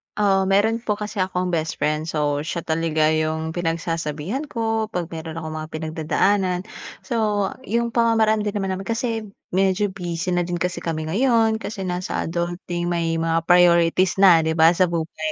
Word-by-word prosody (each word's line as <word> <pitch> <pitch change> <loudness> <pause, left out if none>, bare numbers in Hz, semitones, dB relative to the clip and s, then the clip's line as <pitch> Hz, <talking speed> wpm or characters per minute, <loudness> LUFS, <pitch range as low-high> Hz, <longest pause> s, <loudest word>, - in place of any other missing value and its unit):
Oo 195 -2 +2
meron 210 +4 +2
po 215 -3 -1
kasi 210 0 -6
akong 185 -1 -1
bestfriend. 155 -1 -1
So 150 -2 0
siya 160 +3 -4
talaga 160 -1 +1
yung 160 0 -1
pinagsasabihan 165 - -3
ko 225 -3 -1
'pag 180 -5 -4
meron 160 -1 -6
akong 160 -1 -5
mga 155 - -6
pinagdadaanan. 165 +4 0 0.4
So 210 -5 0 0.2
yung 235 +2 0
pamamaraan 225 -2 +3
din 210 0 -2
naman 195 -2 -1
namin 190 +1 -5
kasi 225 -1 -2 0.2
medyo 195 +2 +1
busy 175 -1 -4
na 175 -1 0
din 175 - -2
kasi 175 +1 -2
kami 160 -2 -3
ngayon 225 0 +2
kasi 205 -3 -5
nasa 180 0 -2
adulting, 175 +1 -3
may 165 -1 0
mga 165 0 0
priorities 175 +1 +4
na 190 -4 +7
di 160 0 0
ba 160 0 +6
sa 180 +1 +2
buhay. 160 -2 -3
175 Hz, 165 wpm, -22 LUFS, 165-205 Hz, 0.4 s, na